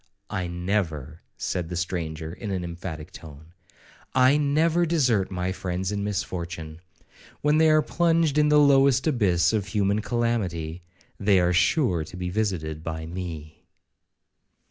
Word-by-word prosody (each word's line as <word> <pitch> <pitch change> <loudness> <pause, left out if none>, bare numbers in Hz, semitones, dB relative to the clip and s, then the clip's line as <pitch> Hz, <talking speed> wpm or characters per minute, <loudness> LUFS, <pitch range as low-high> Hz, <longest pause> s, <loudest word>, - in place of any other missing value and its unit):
'I 90 -1 -2
never,' 85 -4 -3 0.2
said 85 -2 -3
the 90 - -4
stranger, 80 -2 -3
in 105 +3 -7
an 95 -2 -2
emphatic 85 -1 -7
tone,—'I 85 - -2
never 155 +4 +2
desert 130 - +2
my 90 0 -2
friends 95 0 -3
in 100 -1 -2
misfortune. 85 -5 -4 0.6
When 150 +1 +3
they 160 0 +5
are 155 0 +4
plunged 165 -3 +2
in 150 0 +4
the 150 - +5
lowest 140 -2 +5
abyss 100 - +2
of 105 -3 -1
human 105 0 +1
calamity, 95 -9 -2 0.4
they 100 -2 +4
are 90 0 +2
sure 95 - +2
to 90 - -10
be 90 -1 -3
visited 85 -7 -2
by 80 -1 -4
me.' 80 -3 -7
95 Hz, 140 wpm, -25 LUFS, 85-125 Hz, 0.6 s, they